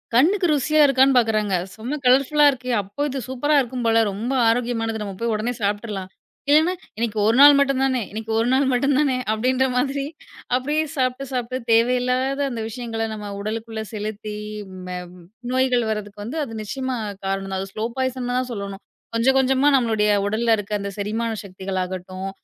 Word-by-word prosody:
கண்ணுக்கு 355 +8 +4
ருசியா 305 +2 +3
இருக்கான்னு 265 -1 +4
பாக்குறாங்க. 215 -4 +2 0.2
செம்ம 245 +7 -4
கலர்ஃபுல்லா 275 +4 +5
இருக்கு. 255 -1 -7
அப்ப 200 +10 -4
இது 270 - -3
சூப்பரா 290 +4 0
இருக்கும் 245 -1 -4
போல. 225 0 +4
ரொம்ப 230 +6 -3 0.2
ஆரோக்கியமானது. 225 -2 -1
நம்ம 200 -1 -5
போய் 235 -1 0
உடனே 230 +4 -1
சாப்ட்ருலாம். 205 -2 -2 0.4
இல்லனா 315 +4 +5 0.3
இன்னைக்கு 225 -1 -2
ஒரு 225 +2 +3
நாள் 290 0 +10
மட்டும் 275 -1 +2
தானே, 260 -2 +1
இன்னைக்கு 220 +1 -5
ஒரு 230 - +1
நாள் 270 +1 +3
மட்டும் 275 +2 +2
தானே 275 -4 +2 0.2
அப்டின்ற 255 +4 +1
மாதிரி, 275 +2 0 0.5
அப்டியே 295 +5 0
சாப்ட்டு 255 0 -1
சாப்ட்டு 255 -1 -2
தேவையில்லாத 250 +4 +2
அந்த 235 -3 -4
விஷயங்கள, 225 -1 -4
நம்ம 210 -1 -6
உடலுக்குள்ள 220 +1 -4
செலுத்தி, 215 0 -5 0.4
ம்ம 180 -1 -6 0.5
நோய்கள் 255 -2 +2
வர்றதுக்கு 210 +4 -5
அது 225 -2 -7
நிச்சயமா 260 +4 -3 0.3
காரணம். 195 0 -2
அது 195 - -5
ஸ்லோ 215 +1 -2
பாய்சென் 260 -1 -2
தான் 255 0 -3
சொல்லணும். 200 -2 -6 0.3
கொஞ்சம் 260 +4 +3
கொஞ்சமா, 265 +1 +3
நம்மளோடய 220 -5 +2
உடல்ல 225 +3 +2
இருக்க. 205 0 -7
அந்த 200 - -3
செரிமான 225 +3 -2
சக்திகள் 190 0 -5
ஆகட்டும். 185 +1 -6
235 Hz, 160 wpm, -22 LUFS, 215-260 Hz, 0.5 s, நாள்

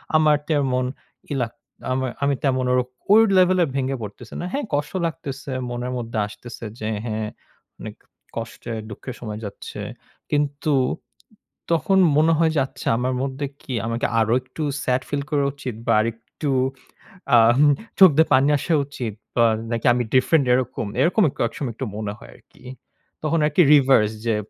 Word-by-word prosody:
আমার 155 -1 +5
তেমন 130 -4 +1 0.5
ইলাক 125 -5 -2 0.4
আমার 130 0 0
আমি 140 -1 +2
তেমন 130 -2 +1
ওর 125 - +4 0.3
ওই 220 +2 +8 0.2
লেভেলের 180 -4 +4
ভেঙে 135 0 0
পড়তেছি 105 +3 -9
না। - - -3
হ্যাঁ, 285 -1 -2
কষ্ট 145 0 0
লাগতেছে। 140 -4 -5 0.2
মনের 120 +1 -4
মধ্যে 115 -2 -5
আসতেছে 115 +2 -10
যে, 110 - -3 0.2
"হ্যাঁ, 110 -1 -2 0.5
অনেক - - -8 0.4
কষ্টে, 115 +1 -6 0.2
দুঃখের 120 +4 -8
সময় 105 -2 -6
যাচ্ছে।" 100 - -8 0.5
কিন্তু 145 0 0 1.0
তখন 170 +4 +2 0.2
মনে 160 +2 +4
হয় 160 0 +3
যে 150 - +3
"আচ্ছা, - - -9
আমার 125 +2 -1
মধ্যে 135 +1 -3 0.2
কি 130 - -6
আমাকে 115 +1 -1
আরো 110 +1 +2
একটু 130 +5 -7 0.2
sad 125 0 +1
feel 145 -1 -1
করা 145 -2 +1
উচিত 130 -5 -6
বা - - +3
আরেকটু 115 +6 -4 0.9
আম 115 +1 +6
হু 150 - +6 0.3
চোখ 190 -2 +10
দিয়ে 160 - +5
পানি 135 +2 +5
আসা 165 - -1
উচিত 125 -6 -5 0.2
বা 120 -1 +5 0.3
নাকি 115 -1 -2
আমি 120 0 0
different 135 +2 +4
এরকম।" 125 -3 -1
এরকম 180 +8 +3
ক - - -25
একসময় 120 +2 -5
একটু 130 - -4
মনে 105 -1 -4
হয় - - -14
আরকি। - - -22 0.6
তখন 160 +2 +1
আরকি 150 +4 +3
reverse 130 -6 +4
যে 115 -2 +2
130 Hz, 160 wpm, -22 LUFS, 115-150 Hz, 1.0 s, চোখ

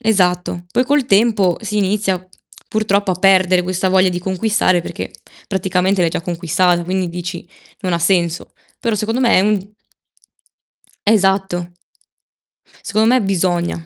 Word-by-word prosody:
Esatto, 180 -4 0
poi 250 - +1
col 285 0 +1
tempo 200 -4 +3
si 215 -1 -4
inizia, 195 -2 0 0.4
purtroppo, 205 -2 0
a - - +1
perdere 185 -1 +4
questa 185 +1 -1
voglia 185 0 +4
di 175 - -3
conquistare 190 0 +1
perché - - -6 0.4
praticamente 190 0 0
l'hai 165 - +2
già - - -3
conquistata, 175 +1 0
quindi 185 0 -1
dici: 175 0 -6 0.4
"Non 185 -4 -2
ha - - 0
senso." 170 -1 0 0.3
Però, 230 -2 -1
secondo 220 +3 -2
me 240 -3 +3
è - - +5
un 205 0 +1 1.5
Esatto. 190 -4 +1 1.1
Secondo 215 +1 +1
me 255 0 +3
bisogna. 175 -4 -1
190 Hz, 140 wpm, -17 LUFS, 175-210 Hz, 1.5 s, è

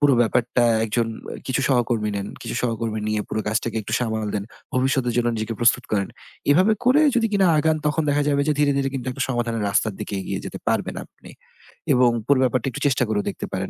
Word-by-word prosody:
পুরো 145 -2 +5
ব্যাপারটা 120 +1 +2 0.2
একজন 115 +1 0 0.4
কিছু 130 +1 0
সহকর্মী 120 -4 +1
নেন। 100 0 -3 0.2
কিছু - - -5
সহকর্মী 115 -2 -2
নিয়ে 110 0 0
পুরো 110 - -2
কাজটাকে 110 +1 -1
একটু 110 - -7
সামাল 110 -3 -1
দেন। 100 -1 -2 0.3
ভবিষ্যতের 130 -1 +1
জন্য 120 -1 +2
নিজেকে 110 +1 -3
প্রস্তুত 120 +1 +3
করেন। 100 -2 +1 0.4
এভাবে 185 +9 +5
করে 255 +5 +5
যদি 235 -2 +3
কিনা 195 -2 +3
আগান 160 +1 +2
তখন 150 +2 +1
দেখা 145 +1 +2
যাবে 140 -1 +2
যে - - +4
ধীরে, 145 -1 +3
ধীরে 135 -1 +1
কিন্তু 130 -2 -4
একটা 130 +2 -3
সমাধানের 120 -3 -1
রাস্তার 110 +2 +1
দিকে - - -5
এগিয়ে 95 - -4
যেতে - - -6
পারবেন - - -1
আপনি - - -16 0.6
এবং 125 -1 +5 0.2
পুরো 140 -2 +4
ব্যাপারটা 130 -1 0
একটু 125 - -7
চেষ্টা 130 -2 +2
করেও 105 -2 0
দেখতে - - -6
পারেন। - - -2
120 Hz, 205 wpm, -23 LUFS, 110-140 Hz, 0.6 s, পুরো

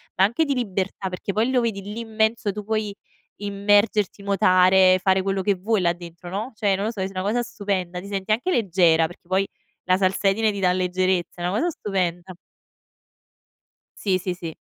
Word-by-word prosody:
ma 190 - +3
anche 235 +11 +2
di 285 - 0
libertà 195 -4 -2
perché 185 +2 -4
poi 225 +5 +1
lo 250 -2 +3
vedi 215 -4 -2
lì 210 +4 -6
immenso, 220 -1 0
tu 210 +1 -6
puoi 215 -1 -2 0.4
immergerti, 205 0 +1
nuotare, 185 -1 +5
fare 190 -1 +3
quello 195 0 -1
che 200 - +3
vuoi 195 +2 0
là 170 -1 +2
dentro, 175 0 -11
no, 215 +7 -3
cioè 200 -2 +1
non 200 +2 -2
lo 220 - -1
so, 210 -5 -6
è 190 +1 -2
una 185 - -3
cosa 220 +5 0
stupenda. 190 -5 -3
Ti 195 - -9
senti 200 +1 -3
anche 245 +12 +1
leggera, 175 - +3
perché 175 +1 -11
poi 190 +2 +1 0.4
la 185 - +3
salsedine 195 +3 +2
ti 200 - -5
dà 180 -2 +3
leggerezza. 180 -1 -1
E' - - +1
una 190 +4 -1
cosa 345 - +1
stupenda. 185 - -3 1.7
Sì, 190 -3 +2
sì, 185 0 -3
sì. 170 -2 -6
195 Hz, 190 wpm, -23 LUFS, 185-210 Hz, 1.7 s, nuotare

